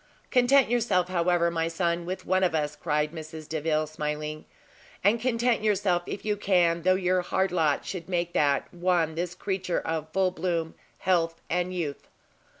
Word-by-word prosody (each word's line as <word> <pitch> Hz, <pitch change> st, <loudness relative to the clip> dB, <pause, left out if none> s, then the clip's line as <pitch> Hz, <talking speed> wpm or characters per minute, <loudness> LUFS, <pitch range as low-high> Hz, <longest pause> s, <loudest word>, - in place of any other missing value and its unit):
"Content 260 Hz, +1 st, +5 dB
yourself, 215 Hz, -7 st, +1 dB
however, 175 Hz, -1 st, +2 dB
my 165 Hz, -1 st, 0 dB
son, 170 Hz, 0 st, -1 dB
with 185 Hz, +1 st, -4 dB
one 185 Hz, +1 st, +2 dB
of 175 Hz, -3 st, +2 dB
us," 150 Hz, -1 st, -1 dB
cried 150 Hz, 0 st, -1 dB
Mrs 160 Hz, -1 st, -8 dB
Delvile, 155 Hz, 0 st, 0 dB
smiling; 150 Hz, 0 st, -4 dB, 0.6 s
"and 215 Hz, +4 st, +3 dB
content 240 Hz, -1 st, +1 dB
yourself, 200 Hz, -4 st, +2 dB
if 200 Hz, -, -6 dB
you 210 Hz, -1 st, +1 dB
can, 175 Hz, -4 st, +2 dB
though 185 Hz, +2 st, +4 dB
your 185 Hz, -1 st, +1 dB
hard 190 Hz, +1 st, 0 dB
lot 160 Hz, -5 st, +1 dB
should 185 Hz, -1 st, -6 dB
make 175 Hz, -1 st, -1 dB
that 145 Hz, -2 st, +1 dB
one 175 Hz, -2 st, +1 dB
this 175 Hz, +2 st, -3 dB
creature 185 Hz, -2 st, -2 dB
of 160 Hz, -1 st, -3 dB
full 190 Hz, 0 st, +2 dB
bloom, 170 Hz, -3 st, -2 dB, 0.2 s
health, 165 Hz, -3 st, +1 dB
and 180 Hz, +1 st, 0 dB
youth! 160 Hz, -6 st, -4 dB
175 Hz, 165 wpm, -27 LUFS, 160-185 Hz, 0.6 s, Content